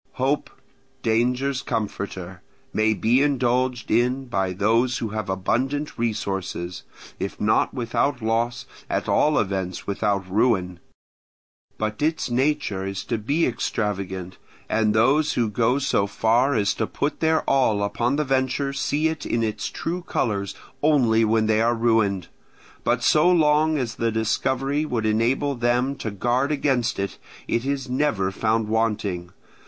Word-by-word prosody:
Hope, 135 Hz, +3 st, 0 dB, 0.5 s
danger's 125 Hz, +4 st, +1 dB
comforter, 95 Hz, -5 st, -4 dB, 0.3 s
may 110 Hz, 0 st, +2 dB
be 120 Hz, +6 st, +3 dB
indulged 125 Hz, -3 st, +1 dB
in 125 Hz, +4 st, +2 dB
by 95 Hz, -6 st, -1 dB
those 115 Hz, +7 st, +2 dB
who 115 Hz, -, -3 dB
have 110 Hz, -1 st, -4 dB
abundant 130 Hz, +10 st, -1 dB
resources, 95 Hz, -6 st, -3 dB, 0.4 s
if 95 Hz, -, -4 dB
not 110 Hz, +1 st, +2 dB
without 125 Hz, +2 st, -1 dB
loss 115 Hz, +1 st, -1 dB, 0.2 s
at -, -, -1 dB
all 150 Hz, 0 st, +3 dB
events 95 Hz, -3 st, -2 dB
without 100 Hz, -1 st, -1 dB
ruin; 95 Hz, -3 st, +1 dB, 1.0 s
but 105 Hz, +2 st, -3 dB
its 155 Hz, -4 st, 0 dB
nature 130 Hz, -6 st, 0 dB
is 95 Hz, 0 st, -4 dB
to 115 Hz, -2 st, -2 dB
be 145 Hz, +10 st, +1 dB
extravagant, 100 Hz, -6 st, -3 dB, 0.3 s
and 110 Hz, -1 st, +1 dB
those 135 Hz, +8 st, +3 dB
who 120 Hz, -2 st, +1 dB
go 115 Hz, +5 st, +2 dB
so 135 Hz, -7 st, +1 dB
far 120 Hz, +6 st, +2 dB
as 100 Hz, -2 st, +2 dB
to 110 Hz, -, -2 dB
put 145 Hz, -, -2 dB
their 160 Hz, 0 st, +2 dB
all 115 Hz, -7 st, +2 dB
upon 120 Hz, +5 st, 0 dB
the 150 Hz, -, +1 dB
venture 135 Hz, +1 st, 0 dB
see 145 Hz, +3 st, 0 dB
it 160 Hz, -1 st, -3 dB
in 115 Hz, -, -1 dB
its 110 Hz, -1 st, -2 dB
true 175 Hz, +2 st, -4 dB
colours 100 Hz, -, -2 dB, 0.3 s
only 125 Hz, -7 st, +4 dB
when 110 Hz, 0 st, +2 dB
they 110 Hz, 0 st, +2 dB
are 120 Hz, +1 st, +2 dB
ruined; 110 Hz, -6 st, +1 dB, 0.6 s
but 120 Hz, 0 st, +1 dB
so 155 Hz, +6 st, +5 dB
long 155 Hz, -2 st, +3 dB
as 120 Hz, -5 st, -2 dB
the 115 Hz, -1 st, -1 dB
discovery 130 Hz, +6 st, 0 dB
would 120 Hz, -7 st, -2 dB
enable 120 Hz, +6 st, +1 dB
them 120 Hz, +2 st, +1 dB
to 115 Hz, -, -4 dB
guard 120 Hz, +7 st, 0 dB
against 130 Hz, -5 st, 0 dB
it, 100 Hz, 0 st, -3 dB, 0.3 s
it 115 Hz, +2 st, 0 dB
is 140 Hz, -1 st, -2 dB
never 125 Hz, -8 st, 0 dB
found 110 Hz, +2 st, 0 dB
wanting. 105 Hz, -5 st, -1 dB
115 Hz, 145 wpm, -24 LUFS, 105-135 Hz, 1.0 s, so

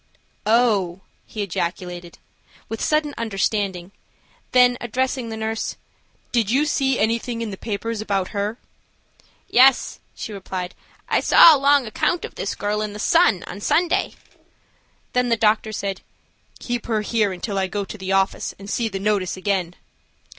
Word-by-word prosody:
"Oh!" 210 Hz, -6 st, +2 dB, 0.3 s
he 215 Hz, -, -4 dB
ejaculated, 175 Hz, -1 st, -4 dB, 0.5 s
with 225 Hz, -, -5 dB
sudden 305 Hz, -1 st, +1 dB
understanding–then, 205 Hz, +4 st, -1 dB
addressing 250 Hz, +1 st, -2 dB
the 220 Hz, -, -5 dB
nurse: 220 Hz, 0 st, -3 dB, 0.6 s
"Did 230 Hz, -4 st, +1 dB
you 275 Hz, +6 st, +3 dB
see 270 Hz, -3 st, +1 dB
anything 230 Hz, +2 st, -1 dB
in 220 Hz, -, -4 dB
the -, -, -5 dB
papers 220 Hz, +2 st, -4 dB
about 195 Hz, -3 st, -1 dB
her?" 205 Hz, +2 st, -2 dB, 0.9 s
"Yes," 260 Hz, +1 st, +4 dB, 0.2 s
she 215 Hz, -, -6 dB
replied, 185 Hz, -2 st, -5 dB, 0.3 s
"I -, -, +2 dB
saw 325 Hz, -, +8 dB
a -, -, -1 dB
long 280 Hz, -1 st, +4 dB
account 320 Hz, -, -1 dB
of -, -, -10 dB
this 195 Hz, -, -4 dB
girl 210 Hz, +1 st, -1 dB
in 210 Hz, -1 st, -3 dB
the -, -, -7 dB
Sun 225 Hz, -, +3 dB
on 200 Hz, +3 st, -8 dB
Sunday." 340 Hz, +9 st, +1 dB, 1.0 s
Then 250 Hz, -1 st, +1 dB
the 230 Hz, -, +2 dB
doctor 220 Hz, 0 st, +2 dB
said: 200 Hz, -3 st, -4 dB, 0.6 s
"Keep 240 Hz, -1 st, -4 dB
her 220 Hz, -2 st, 0 dB
here 215 Hz, -1 st, +1 dB
until 195 Hz, +2 st, -3 dB
I 190 Hz, -, 0 dB
go 200 Hz, +1 st, -3 dB
to -, -, -8 dB
the 190 Hz, 0 st, -4 dB
office 195 Hz, 0 st, 0 dB
and 200 Hz, -, -11 dB
see 235 Hz, -, 0 dB
the 195 Hz, -, -4 dB
notice 200 Hz, -2 st, 0 dB
again." 185 Hz, -3 st, -1 dB
215 Hz, 155 wpm, -22 LUFS, 195-240 Hz, 1.0 s, saw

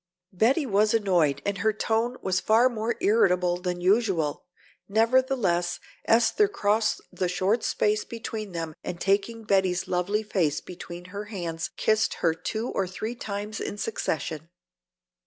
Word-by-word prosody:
Betty 250 Hz, -, +3 dB
was 210 Hz, -1 st, +3 dB
annoyed 175 Hz, -10 st, +2 dB
and 200 Hz, -1 st, -1 dB
her 220 Hz, +3 st, +3 dB
tone 225 Hz, +3 st, -1 dB
was 185 Hz, -1 st, +1 dB
far 225 Hz, +6 st, +4 dB
more 230 Hz, -1 st, -2 dB
irritable 180 Hz, -4 st, +3 dB
than 180 Hz, 0 st, -3 dB
usual. 185 Hz, -7 st, +1 dB, 0.4 s
Nevertheless, 220 Hz, -6 st, +2 dB, 0.3 s
Esther 235 Hz, -, +4 dB
crossed 215 Hz, -, +1 dB
the 180 Hz, -, -1 dB
short 200 Hz, +5 st, +1 dB
space 210 Hz, 0 st, +1 dB
between 220 Hz, -3 st, -6 dB
them 165 Hz, -2 st, -4 dB
and 175 Hz, -, -5 dB
taking 200 Hz, +5 st, 0 dB
Betty's 190 Hz, -3 st, +1 dB
lovely 185 Hz, +4 st, 0 dB
face 170 Hz, -8 st, 0 dB
between 175 Hz, 0 st, -9 dB
her 205 Hz, +1 st, -4 dB
hands 170 Hz, -6 st, -4 dB
kissed 220 Hz, +1 st, +2 dB
her 165 Hz, -2 st, +1 dB
two 220 Hz, +8 st, -4 dB
or 195 Hz, -, -1 dB
three 215 Hz, +5 st, -4 dB
times 210 Hz, -2 st, -5 dB
in 205 Hz, -, -4 dB
succession. 160 Hz, -7 st, -3 dB
200 Hz, 140 wpm, -26 LUFS, 180-220 Hz, 0.4 s, far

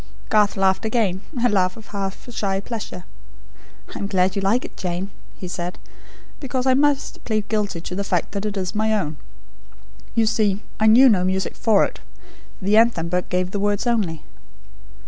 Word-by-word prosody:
Garth 210 Hz, -2 st, +3 dB
laughed 190 Hz, +1 st, +2 dB
again; 215 Hz, -5 st, 0 dB, 0.2 s
a -, -, +7 dB
laugh 190 Hz, -2 st, +1 dB
of 220 Hz, -, -11 dB
half 195 Hz, +1 st, -5 dB
shy 195 Hz, -3 st, -1 dB
pleasure. 205 Hz, -4 st, -6 dB, 0.9 s
"I -, -, -6 dB
am 200 Hz, -, -2 dB
glad 185 Hz, -1 st, +1 dB
you 200 Hz, -, 0 dB
like 215 Hz, +6 st, +1 dB
it, -, -, -10 dB
Jane," 180 Hz, +2 st, -3 dB, 0.3 s
he 185 Hz, -, -6 dB
said, 175 Hz, 0 st, -4 dB, 0.6 s
"because 260 Hz, -2 st, -2 dB
I 260 Hz, -, +5 dB
must 285 Hz, +1 st, +1 dB
plead 215 Hz, -2 st, -1 dB
guilty 205 Hz, -6 st, -1 dB
to 180 Hz, -, -6 dB
the 200 Hz, +2 st, -2 dB
fact 180 Hz, -3 st, -1 dB
that 200 Hz, +1 st, -2 dB
it 205 Hz, -1 st, -4 dB
is 185 Hz, -2 st, -2 dB
my 220 Hz, +1 st, +1 dB
own. 155 Hz, -6 st, -3 dB, 1.0 s
You 230 Hz, -, +4 dB
see, 210 Hz, -2 st, +1 dB, 0.2 s
I 220 Hz, -, +4 dB
knew 245 Hz, +5 st, +8 dB
no 200 Hz, -7 st, +4 dB
music 190 Hz, +1 st, -1 dB
for 220 Hz, -4 st, +3 dB
it; -, -, -7 dB, 0.6 s
the 205 Hz, +2 st, +2 dB
Anthem 225 Hz, -8 st, +3 dB
book 180 Hz, +1 st, -1 dB
gave 180 Hz, 0 st, 0 dB
the 205 Hz, -, -2 dB
words 205 Hz, +2 st, 0 dB
only. 205 Hz, -10 st, 0 dB
200 Hz, 185 wpm, -22 LUFS, 185-220 Hz, 1.0 s, knew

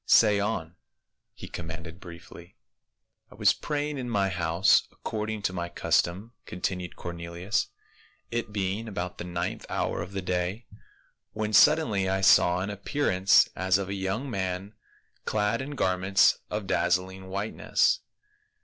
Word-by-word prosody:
"Say 105 Hz, -3 st, +6 dB
on," 100 Hz, -5 st, -3 dB, 0.5 s
he -, -, -10 dB
commanded 80 Hz, +1 st, -7 dB
briefly. 85 Hz, 0 st, -12 dB, 0.4 s
" -, -, -47 dB
I -, -, -13 dB
was -, -, +4 dB
praying 150 Hz, -1 st, -3 dB
in 125 Hz, -1 st, -4 dB
my 100 Hz, -4 st, +1 dB
house 85 Hz, 0 st, +3 dB
according 110 Hz, -1 st, -4 dB
to 95 Hz, -, 0 dB
my 85 Hz, -1 st, -3 dB
cus -, -, +3 dB
tom," 95 Hz, +7 st, -8 dB
continued 90 Hz, 0 st, -4 dB
Cornelius, 85 Hz, +3 st, -3 dB, 0.6 s
"it 115 Hz, -2 st, -2 dB
being 100 Hz, +2 st, -2 dB
about 90 Hz, -4 st, -5 dB
the -, -, -3 dB
ninth 90 Hz, 0 st, -3 dB
hour -, -, -1 dB
of 90 Hz, +3 st, -7 dB
the 95 Hz, -1 st, -3 dB
day, 90 Hz, +5 st, -2 dB, 0.7 s
when 110 Hz, 0 st, -3 dB
suddenly 105 Hz, -6 st, +5 dB
I 95 Hz, 0 st, 0 dB
saw 90 Hz, -1 st, +5 dB
an 100 Hz, +2 st, -3 dB
appearance 100 Hz, -3 st, +3 dB
as 95 Hz, +1 st, +2 dB
of 100 Hz, -1 st, -4 dB
a -, -, -2 dB
young 100 Hz, +7 st, -2 dB
man 95 Hz, -3 st, -3 dB, 0.5 s
clad 105 Hz, +2 st, 0 dB
in 145 Hz, +2 st, -6 dB
garments 95 Hz, -3 st, +3 dB
of 105 Hz, -1 st, -3 dB
dazzling 95 Hz, +1 st, 0 dB
white 100 Hz, +3 st, -3 dB
ness. -, -, +2 dB
95 Hz, 150 wpm, -27 LUFS, 90-105 Hz, 0.7 s, Say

